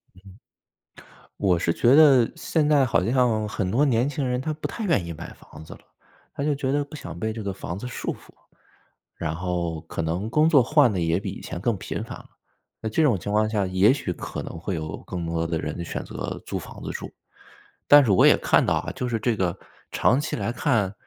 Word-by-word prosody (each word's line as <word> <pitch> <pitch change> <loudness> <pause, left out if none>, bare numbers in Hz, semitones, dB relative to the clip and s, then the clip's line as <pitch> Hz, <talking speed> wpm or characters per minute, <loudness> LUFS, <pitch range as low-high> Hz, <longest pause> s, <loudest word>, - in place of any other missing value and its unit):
嗯。 95 +1 -16 1.0
我 95 -4 +3
是 85 - +1
觉 120 +8 +3
得 140 -6 +6
现 160 -2 0
在 150 -2 +4
好 95 -9 +2
像 115 -3 +2
很 100 -3 -2
多 130 +9 +3
年 125 0 +2
轻 140 -2 -2
人， 125 0 -1
他 155 - -2
不 155 - -5
太 230 - -6
愿 160 - +1
意 85 - -5
买 75 - -9
房 80 - -14
子 - - -10
了， - - -15 0.5
他 - - -4
就 150 0 +1
觉 135 -1 -2
得 145 +1 +1
不 145 +2 -11
想 90 - -8
被 110 +4 -1
这 110 -1 -6
个 100 -1 -3
房 90 -2 -6
子 105 - -7
束 125 - -4
缚。 - - -13 0.9
然 80 - -3
后 85 -2 -3
可 80 - -6
能 85 +6 -2
工 150 +6 +3
作 145 -6 +6
换 140 -1 +4
得 95 - -1
也 85 +1 +1
比 100 0 -5
以 - - -9
前 85 - -6
更 115 +2 0
频 - - -5
繁 - - -8
了。 - - -16 0.5
那 110 - -3
这 110 +9 +1
种 130 -10 +3
情 100 +4 -5
况 110 +1 +2
下， 105 -3 0
也 95 +5 +4
许 135 -10 -3
可 - - -6
能 - - -8
会 95 +3 -4
有 80 -1 -5
更 90 -2 -5
多 85 0 -1
的 80 -1 -2
人 85 +1 -4
选 - - -5
择 - - -6
租 - - -3
房 - - -11
子 - - -4
住。 - - -6 0.8
但 145 -1 +8
是 110 - +2
我 95 - +5
也 - - +6
看 - - +3
到 - - +1
啊， - - -3
就 125 - -3
是 120 -2 -1
这 115 +1 0
个 90 -4 -1 0.3
长 125 - +3
期 150 - -3
来 105 +2 -2
看， 115 -8 0
110 Hz, 255 characters per minute, -24 LUFS, 90-135 Hz, 1.0 s, 但